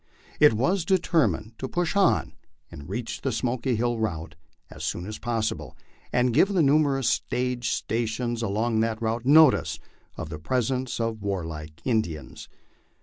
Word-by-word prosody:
It 150 -5 +7
was 170 - +1
determined 160 - +1
to 130 - -3
push 175 +5 -1
on 200 -2 +2 0.4
and 70 +2 -10
reach 115 +4 -4
the 135 - -1
Smoky 125 +2 -1
Hill 120 +1 0
route 80 -7 -3 0.4
as - - -9
soon 90 - -3
as 110 +2 -6
possible, 110 - -3 0.3
and 125 -1 +2
give 190 - +5
the 175 -4 +3
numerous 140 -2 +3
stage 125 -2 -1
stations 115 +1 -2
along 110 +1 0
that 110 0 0
route 115 +2 -2
notice 150 -1 +5 0.4
of - - -5
the 75 -1 -6
presence 125 +7 -1
of 115 -2 -2
warlike 80 -6 -5
Indians. 85 - -2
115 Hz, 145 wpm, -26 LUFS, 105-130 Hz, 0.4 s, It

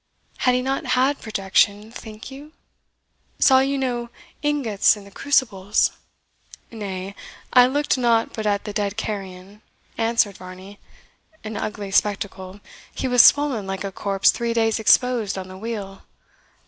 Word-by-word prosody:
Had 250 -1 +3
he 250 - 0
not 270 +1 -2
had 270 +3 +1
projection, 205 +1 0
think 220 +2 -10
you? 290 +3 -12 0.8
Saw 265 -2 +5
you 275 +1 0
no 245 -3 -2 0.3
ingots 270 -9 +2
in 205 - -12
the 200 - -15
crucibles?" 210 -6 +1 0.8
"Nay, 195 -3 -6 0.4
I 250 -1 +7
looked 285 0 0
not 230 -2 +2
but 220 -1 -3
at 200 -1 0
the 210 - -6
dead 205 0 -2
carrion," 195 -1 -6 0.4
answered 225 -3 +1
Varney; 185 +2 -12 0.6
"an 215 0 -6
ugly 205 -1 -5
spectacle 195 -1 -1 0.3
he 265 - -2
was 245 -1 +6
swollen 275 -9 +4
like 195 0 -4
a 195 - -4
corpse 195 0 +2
three 235 -1 -3
days 225 -1 +1
exposed 225 -2 +2
on 185 -1 -6
the 185 - -10
wheel. 205 -3 -6
215 Hz, 145 wpm, -22 LUFS, 200-250 Hz, 0.8 s, I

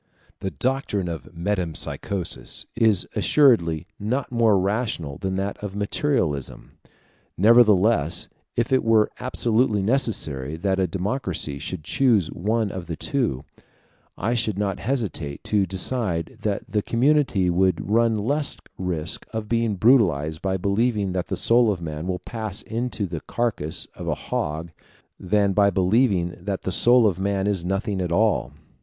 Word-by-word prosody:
The 95 - -3
doctrine 105 - -2
of 85 -2 -6
metempsychosis 90 0 -2
is 110 -5 +3
assuredly 110 - +3
not 125 +7 -2
more 115 -4 +3
rational 95 - -2
than 95 -1 -2
that 100 +1 -3
of 100 -1 -5
materialism; 100 - -1 0.7
nevertheless 105 -6 +4 0.3
if 120 +2 0
it 130 - +3
were 110 -1 +3
absolutely 115 -4 +1
necessary 80 - 0
that 95 +2 0
a 95 - +2
democracy 95 - -2
should 80 +1 -5
choose 110 - +2
one 110 +3 -1
of 90 -3 -7
the 85 - -4
two, 115 - -1 0.7
I 110 +5 -1
should 110 -4 0
not 100 -1 -1
hesitate 100 - -3
to 100 -3 +1
decide 95 -2 -1
that 105 -2 -1
the 105 +1 0
community 120 -7 +2
would 95 0 +1
run 115 +1 +2
less 140 +8 -1 0.2
risk 90 -3 -2
of 110 -1 -4
being 115 -2 0
brutalized 85 - +3
by 95 -1 -1
believing 100 +1 0
that 90 -1 -2
the - - -3
soul 115 -1 +4
of 95 - -3
man 80 0 -5
will 90 -1 -1
pass 110 -1 -4
into 115 -2 -3
the 85 -4 -5
carcass 90 -9 -2
of - - -8
a - - 0
hog, 80 +3 -4 0.5
than 100 +1 +1
by 100 0 +4
believing 95 -1 +2
that 95 +2 -4
the 95 - -2
soul 120 +6 +6
of 95 -4 +1
man 100 0 0
is 100 -4 0
nothing 95 +1 -2
at 90 -2 -2
all. 105 +4 +1
100 Hz, 150 wpm, -23 LUFS, 90-115 Hz, 0.7 s, soul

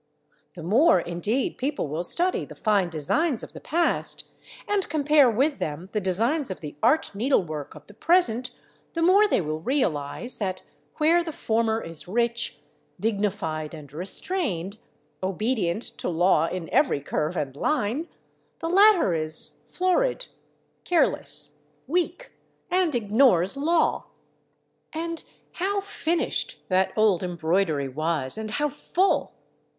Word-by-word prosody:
The 170 - -8
more, 215 - +5
indeed, 175 +10 -2
people 280 - -1
will 155 +4 -3
study 355 - 0
the - - -10
fine 205 -5 +1
designs 225 - 0
of - - -10
the - - -10
past, 335 +2 0 0.4
and 410 -2 0
compare 295 -2 +4
with 270 +6 +1
them 160 +5 -4
the 215 - 0
designs 230 - +1
of 190 - -5
the 150 -2 -8
art 315 -7 +2
needlework 185 - -1
of 150 -1 -13
the 205 - -15
present, 250 - +2 0.4
the 330 - -1
more 395 +5 +6
they 395 - +2
will 155 -1 -3
realise 185 - -1
that, 185 -3 -3 0.3
where 330 +3 +3
the 330 - -5
former 225 -4 0
is 165 0 -7
rich, 235 +3 0 0.4
dignified, 195 -8 -2
and 145 -3 -12
restrained, 195 - -3 0.4
obedient 200 0 -1 0.2
to - - -2
law 170 -1 +3
in 180 -2 -4
every 265 - +2
curve 155 +4 -2
and 135 -2 -3
line, 280 - -1 0.5
the 330 - -4
latter 385 - +5
is 155 -1 0
florid, - - +1 0.6
careless, 350 -2 +1 0.2
weak, 360 - -2 0.4
and 360 -5 +2
ignores 215 -3 +3
law. 320 +4 +1 0.8
And 335 +1 -4 0.3
how 400 +3 -1
finished 395 +4 -2
that 185 0 +2
old 215 -5 +3
embroidery 170 -4 0
was, 150 0 -1
and 220 0 -4
how 295 +7 0
full! 350 +6 0
220 Hz, 135 wpm, -25 LUFS, -, 0.8 s, more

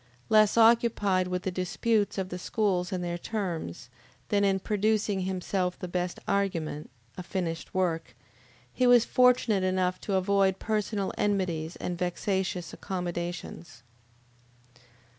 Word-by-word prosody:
Less 215 0 +5
occupied 225 -5 +4
with 180 0 -3
the 190 - -1
disputes 205 +4 0
of 190 -1 -2
the 180 - -5
schools 185 -2 0
and 180 -2 -2
their 175 0 -3
terms, 170 - -4 0.4
than 205 -1 +2
in 195 -1 +3
producing 210 0 0
himself 185 0 -2
the 180 - -6
best 180 0 -2
argument, 175 -7 -1 0.3
a - - -3
finished 175 -3 -4
work, 170 -3 -1 0.6
he 250 - +2
was 245 -2 +6
fortunate 250 -6 +3
enough 185 -1 0
to 200 - -2
avoid 190 0 +2
personal 210 -2 -2
enmities 180 -6 -1
and 175 -1 -4
vexatious 180 -1 -2
accommodations. 175 - -5
190 Hz, 125 wpm, -28 LUFS, 180-205 Hz, 0.6 s, was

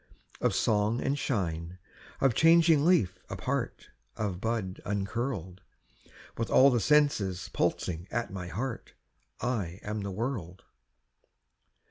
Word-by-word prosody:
Of - - +1
song 105 +2 +2
and 135 +2 0
shine, 85 - -2 0.4
of 135 -3 +4
changing 165 +1 +5
leaf 100 - +3
apart, - - -3 0.3
Of 100 -4 -3
bud 110 -5 -2
uncurled: 100 -2 -3 0.8
With 115 -4 -1
all 135 +6 +6
the 120 - +2
senses 110 -8 +2
pulsing 85 +1 -1
at 120 -4 -3
my 90 -2 -5
heart, 115 +9 -5 0.5
I 100 -8 -2
am 105 +1 -3
the 100 - -4
world. 100 -4 -4
105 Hz, 115 wpm, -29 LUFS, 95-130 Hz, 0.8 s, all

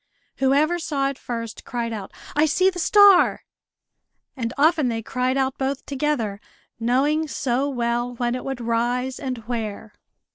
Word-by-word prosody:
Whoever 285 +6 +2
saw 280 -4 -1
it 275 - -7
first 230 -2 -6
cried 235 -1 -3
out, 200 -3 -6 0.2
"I 305 +1 +4
see 370 +5 +3
the 355 - -7
star!" 400 +1 +6 0.9
And 230 -4 -3
often 310 -1 +3
they 225 -2 -2
cried 255 +3 -1
out 265 -1 -1
both 270 0 -2
together, 260 -8 -2 0.4
knowing 280 +7 +1
so 270 -1 -1
well 240 -1 -1
when 240 0 -1
it 250 - -4
would 270 -2 -4
rise, 240 +3 -1
and 260 -3 -3
where. 220 -2 -4
260 Hz, 150 wpm, -23 LUFS, 235-290 Hz, 0.9 s, star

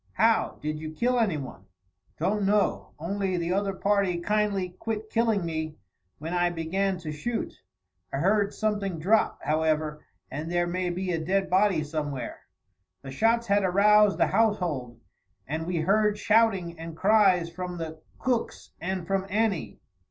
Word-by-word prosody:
"How? 225 0 +2
Did 155 0 -2
you 155 0 -7
kill 245 +6 +1
anyone?" 150 - -2 0.5
"Don't 200 +5 0
know, 205 +1 +1
only 190 +3 -2
the 170 +1 -1
other 195 0 0
party 195 -3 +1
kindly 205 0 0
quit 220 -1 -4
killing 225 -5 +1
me 160 -1 -3 0.4
when 160 +4 -5
I 175 0 +2
began 185 +3 -1
to 155 -2 -5
shoot. 220 +10 -3 0.6
I - - -2
heard 200 +6 +2
something 205 -4 -1
drop, 205 +8 +2
however, 155 -1 0 0.3
and 155 +5 -4
there 175 0 +2
may 180 +1 -1
be 180 +1 -2
a 165 -2 -1
dead 190 +3 0
body 190 -4 +3
somewhere." 145 -3 -4 0.6
The 135 - -7
shots 230 - +2
had 200 -2 +2
aroused 205 +2 +5
the - - +4
household, 175 - 0 0.5
and 160 +4 -3
we 180 -1 -1
heard 210 +4 +2
shouting 200 -7 +2
and 165 0 -7
cries 190 -4 +4
from 180 0 -5
the 160 -1 -6 0.2
Cooks 250 -3 -2
and 185 0 -3
from 195 +1 -1
Annie. 205 -3 -1
185 Hz, 150 wpm, -27 LUFS, 160-210 Hz, 0.6 s, aroused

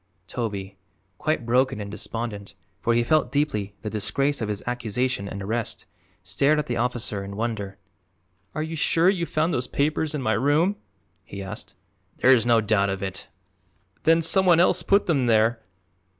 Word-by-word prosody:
Toby, 100 -3 -5 0.4
quite 155 -6 -1
broken 125 -1 +2
and 100 -1 -6
despondent, 105 -2 -5 0.3
for 115 - +2
he 120 - +3
felt 155 +4 +2
deeply 105 -9 -1
the 105 - -3
disgrace 135 +6 0
of 110 - -2
his 105 -1 -3
accusation 125 -2 -1
and 100 0 -6
arrest, 115 +3 -3 0.4
stared 150 +2 +2
at 150 - 0
the 120 - -2
officer 120 -4 -1
in 100 0 -7
wonder. 105 -3 -3 0.8
"Are 155 - -1
you 160 +1 -5
sure 165 +3 +3
you 170 -4 -2
found 160 +2 0
those 125 - -1
papers 150 +1 0
in 145 - -2
my 110 - +2
room?" 145 - +2 0.5
he 100 +1 -8
asked. 105 +3 -8 0.4
"There 130 - +6
is 120 -2 +2
no 115 -1 +5
doubt 105 -2 +2
of 95 0 -3
it." 95 +1 -5 0.7
"Then 165 0 +4
some 190 +3 +4
one 170 -2 +6
else 180 0 +4
put 200 +4 +3
them 140 -7 +1
there. 115 +1 +3
120 Hz, 175 wpm, -24 LUFS, 105-150 Hz, 0.8 s, There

